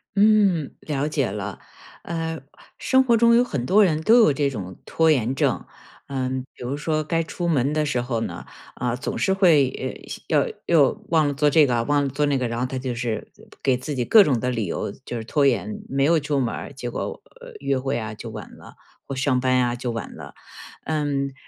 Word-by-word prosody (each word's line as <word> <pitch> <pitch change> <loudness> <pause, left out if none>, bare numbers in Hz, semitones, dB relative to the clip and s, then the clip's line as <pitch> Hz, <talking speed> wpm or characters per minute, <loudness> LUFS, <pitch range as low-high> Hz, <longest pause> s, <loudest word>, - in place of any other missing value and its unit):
嗯， 200 -7 +3
了 145 -1 -2
解 150 -4 0
了。 100 0 -5 0.4
呃， 165 -1 -3 0.4
生 260 0 +3
活 235 -3 +3
中 235 +1 +5
有 240 - +5
很 140 - -3
多 205 +9 +5
人 160 -5 +1
都 225 +9 +5
有 155 - +5
这 140 0 0
种 95 -8 -7
拖 160 -1 +2
延 130 -3 +1
症， - - 0 0.4
嗯， 130 -1 -2
比 - - -11
如 125 +3 -2
说 155 +1 -1
该 165 +2 0
出 175 +2 -4
门 145 -3 +1
的 155 0 +1
时 125 -4 0
候 120 -2 -2
呢， - - -5 0.3
啊， 120 -1 -2
总 135 - -4
是 190 - +1
会 160 -9 +2 0.3
要 - - +2 0.2
要 155 -5 +5 0.2
忘 160 -3 +3
了 145 - -1
做 145 +2 +2
这 150 0 +5
个， 120 -2 +1
忘 145 +3 +1
了 140 - -1
做 145 +3 0
那 145 -1 +1
个。 125 -2 -1
然 115 0 -3
后 125 - 0
他 130 +1 -4
就 125 -2 -3
是 115 -2 -4 0.3
给 130 -2 +2
自 140 +4 -5
己 125 -3 -1
各 215 - +7
种 135 -9 +1
的 125 - -1
理 115 -4 -1
由 90 - -3
就 120 - -5
是 115 - -5
拖 145 +5 +1
延， 105 -6 0
没 135 +1 0
有 165 +2 +4
出 145 -1 -1
门 120 -3 -1
儿， - - -8
结 125 -3 -5
果 120 - -5 0.4
约 140 - 0
会， 130 -1 -2
啊， 110 -1 -5
就 - - -8
晚 - - -9
了， - - -14 0.3
或 135 - -5
上 130 -1 +1
班 130 0 +1
呀 120 -1 +1
就 120 0 -4
晚 115 -1 -6
了。 - - -10 0.5
嗯， 145 -3 -1
140 Hz, 235 characters per minute, -23 LUFS, 125-155 Hz, 0.5 s, 各